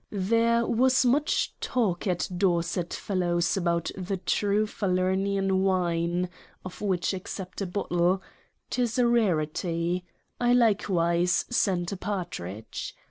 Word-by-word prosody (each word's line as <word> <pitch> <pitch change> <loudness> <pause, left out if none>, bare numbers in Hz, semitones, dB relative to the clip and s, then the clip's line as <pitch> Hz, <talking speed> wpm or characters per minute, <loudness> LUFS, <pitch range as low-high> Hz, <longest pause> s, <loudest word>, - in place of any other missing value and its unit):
There 230 +4 +2
was 255 +3 +3
much 285 +5 +2
talk 210 -8 0
at 180 -2 0
Dorset 175 -1 0
Fellowes's 175 -3 0
about 170 -3 0
the 190 +1 -3
true 205 +3 +1
Falernian 190 0 0
wine, 175 -2 +1 0.4
of 185 - -8
which 190 -3 0
accept 185 0 -6
a 195 - -1
Bottle: 175 -1 +1 0.5
'Tis 240 -2 0
a 250 - +4
rarity; 175 -5 +1 0.4
I 245 0 +3
likewise 180 -7 +2
send 185 -6 +1
a - - -5
Partridge. 115 - -5
185 Hz, 115 wpm, -27 LUFS, 175-210 Hz, 0.5 s, a